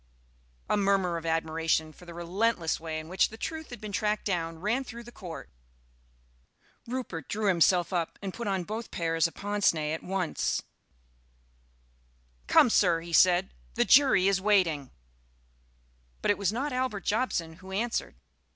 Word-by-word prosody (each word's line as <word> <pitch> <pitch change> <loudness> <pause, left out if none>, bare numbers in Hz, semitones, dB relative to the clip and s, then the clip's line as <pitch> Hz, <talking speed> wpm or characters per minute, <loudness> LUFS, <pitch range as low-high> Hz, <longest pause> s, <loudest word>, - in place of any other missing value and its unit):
A - - +2
murmur 195 -4 +2
of 165 0 -6
admiration 160 -1 0
for 180 - -16
the 170 - -8
relentless 175 0 0
way 160 -1 -4
in 155 - -9
which 185 +3 +2
the 220 - -11
truth 320 +6 -5
had 245 - -8
been 215 -1 -7
tracked 210 +1 -1
down 165 -4 -2
ran 215 +10 0
through 235 -2 -9
the 240 - -12
Court. 180 -8 -8 1.4
Rupert 235 - -5
drew 215 0 -2
himself 180 -1 +3
up 170 -2 -1
and 195 -2 -5
put 235 -2 -5
on 190 -2 0
both 220 +5 -5
pairs 165 -1 +1
of 165 - -13
pince 205 -3 +1
nez 155 -1 -2
at 160 - -4
once. 185 -3 -1 1.8
"Come, 235 - +6
Sir!" 175 -6 +3
he 170 0 -9
said; 180 +2 +4 0.2
"the - - +2
jury 265 -9 +6
is 195 -1 +2
waiting." 180 -9 +2 1.3
But - - +4
it 205 - 0
was 200 -1 +1
not 265 +6 -2
Albert 255 -6 -2
Jobson 175 -8 -1
who 190 +1 -12
answered. 225 +5 -2
190 Hz, 160 wpm, -28 LUFS, 165-215 Hz, 1.8 s, Come